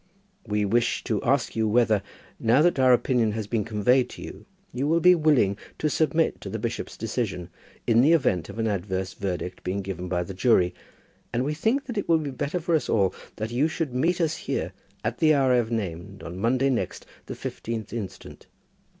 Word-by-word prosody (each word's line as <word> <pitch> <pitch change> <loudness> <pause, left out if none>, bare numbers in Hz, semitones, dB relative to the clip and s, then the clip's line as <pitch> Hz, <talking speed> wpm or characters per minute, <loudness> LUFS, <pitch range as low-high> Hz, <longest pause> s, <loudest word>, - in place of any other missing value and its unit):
We 105 -1 +1
wish 120 +3 +1
to 110 -5 -1
ask 135 +1 +1
you 110 -1 +1
whether, 110 -2 +3 0.4
now 120 +6 +4
that 175 -5 +3
our 130 -1 +6
opinion 120 -3 +2
has 110 -1 -3
been 110 0 -1
conveyed 120 +4 +2
to - - -9
you, - - -10 0.3
you 135 +3 -1
will 165 +2 +3
be 180 +2 +7
willing 145 - +3 0.2
to 155 - 0
submit 160 +1 +1
to - - -6
the - - -3
bishop's - - -4
decision, 90 0 -3 0.4
in 115 0 +4
the 150 +6 +5
event 90 - +1
of - - -8
an 115 - 0
adverse 95 -2 -2
verdict 90 -2 -4
being 95 +2 -2
given 90 -2 -5
by 90 -1 0
the 95 - -7
jury; 95 -3 +3 0.6
and 120 +2 0
we 150 - -1
think 225 - 0
that 240 -5 -3
it - - -5
will 165 - +6
be 150 -3 -3
better 145 +7 -2
for 170 +1 -1
us 160 - +1
all 95 -4 +2 0.2
that 110 +1 -4
you 130 +6 +2
should 160 -4 -3
meet 165 +8 +1
us 160 -2 +1
here - - -3 0.3
at 115 +3 -2
the 155 -1 +5
hour 135 -2 +3
I - - +5
have 115 -2 0
named 100 -3 -4
on 85 +1 -7
Monday 130 +5 +2
next, 125 - -3 0.2
the - - -5
15th 115 -2 -5
instant. 110 -5 -7
120 Hz, 210 wpm, -26 LUFS, 100-145 Hz, 0.6 s, be